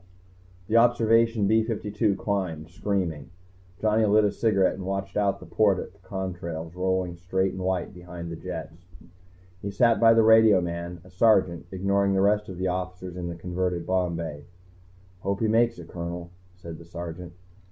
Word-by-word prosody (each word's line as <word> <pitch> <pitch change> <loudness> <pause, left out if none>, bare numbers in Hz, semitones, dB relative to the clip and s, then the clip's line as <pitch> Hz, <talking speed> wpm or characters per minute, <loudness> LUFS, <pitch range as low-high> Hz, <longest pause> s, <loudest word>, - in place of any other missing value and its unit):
The 110 +5 +2
Observation 115 -2 +4
B 110 +3 +4
52 105 -2 -1
climbed, 90 -6 -3
screaming. 85 -5 -2 0.5
Johnny 110 +1 +2
lit 105 0 +4
a 100 - +2
cigarette 100 -5 +2
and 95 - -7
watched 95 0 -4
out 100 -1 +1
the - - -11
port 100 -3 +2
at 90 - -6
the 100 - -25
contrails 90 -3 -5
rolling 90 -1 -1
straight 95 +2 0
and 95 - -7
white 95 0 -1
behind 90 -1 -8
the - - -4
jets. 85 0 -8 0.7
He 100 - -4
sat 115 +3 +3
by 115 0 +6
the 115 - +5
radioman, 90 -6 +3
a 90 - -17
Sergeant, 95 -3 +2
ignoring 100 +1 +1
the 95 - +2
rest 105 +1 +2
of 95 - -7
the 95 +1 -1
officers 90 0 -4
in 90 -1 -4
the 85 - -5
converted 90 0 -2
bomb 90 -2 0
bay. 75 -3 -6 0.7
"Hope 100 +1 -2
he 115 - +1
makes 115 +1 +2
it, 85 - -10
Colonel," 85 0 -6 0.2
said 85 -3 -9
the 85 - -12
Sergeant. 85 +1 -7
95 Hz, 175 wpm, -26 LUFS, 85-105 Hz, 0.7 s, by